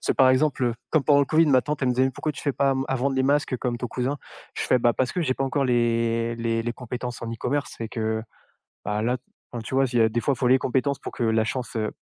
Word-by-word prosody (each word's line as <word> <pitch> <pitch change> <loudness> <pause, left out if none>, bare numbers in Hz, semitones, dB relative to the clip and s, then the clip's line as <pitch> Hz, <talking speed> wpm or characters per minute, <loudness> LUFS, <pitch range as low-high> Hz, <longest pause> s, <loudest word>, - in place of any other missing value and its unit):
C'est - - 0
par 130 -1 +5
exemple, 130 -1 +2
heu, 120 -1 +1 0.2
comme 155 -3 +3
pendant 145 -1 +5
le - - +3
COVID, 160 +2 +4
ma 130 -3 +4
tante, 150 -1 -3
elle 130 - +2
me 125 - +1
disait: 130 +1 +2
«Pourquoi 155 - -3
tu - - -9
fais 140 - 0
pas 140 +1 +2
à - - +3
m 135 0 -1
à 135 - 0
vendre 135 +2 0
les 130 - +2
masques 140 -1 +1
comme 120 -1 -2
ton 125 - -3
cousin?» 130 +3 -2 0.4
Je - - -3
fais: 130 - +3
«Ben 120 0 +3
parce 130 -1 -1
que 180 - -1
j'ai 130 - +1
pas 135 - -1
encore 135 +1 0
les 115 -1 +1
les 115 -1 -1
les 120 0 -2
compétences 125 0 -6
en 115 - -4
e-commerce» 130 +3 -3
et 115 - -3
que 110 -1 -2 0.6
bah 105 +1 -1
là, 120 +3 +1 0.4
enfin 120 - -4
tu 130 - -6
vois, 135 0 +4
s'il 120 -1 -1
y - - +7
a, 110 - +4
des 120 +2 -1
fois 140 - +1
il - - -16
faut 125 - +2
les 130 +1 +6
compétences 135 +2 0
pour - - -7
que 120 - -2
la 110 0 +2
chance, 125 +1 -4
heu 110 -1 -1
125 Hz, 305 wpm, -25 LUFS, 115-135 Hz, 0.6 s, y